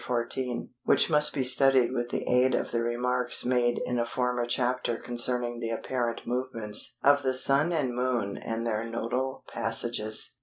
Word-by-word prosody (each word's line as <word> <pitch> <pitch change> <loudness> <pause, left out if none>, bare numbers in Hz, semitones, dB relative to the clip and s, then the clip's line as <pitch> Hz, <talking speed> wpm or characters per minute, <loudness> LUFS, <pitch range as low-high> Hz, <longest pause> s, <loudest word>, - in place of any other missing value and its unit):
14 120 +1 -3
which - - +3
must 150 0 +5
be 135 - -1
studied 130 -1 +4
with 120 -2 -2
the - - -3
aid 125 +1 +3
of - - -2
the 115 - 0
remarks 125 +1 +1
made 120 -1 +1
in 125 -1 -1
a - - +2
former 125 0 -1
chapter 125 -1 -1
concerning 120 0 -2
the 115 -1 -3
apparent 120 +1 -3
movements 120 -1 -2
of 140 0 +5
the 130 -1 0
Sun 140 +5 +2
and 145 -7 0
Moon 120 -5 -1
and 115 +1 -4
their 110 -1 -1
nodal 120 +3 -3
passages. 115 -1 -1
125 Hz, 165 wpm, -28 LUFS, 120-130 Hz, -, must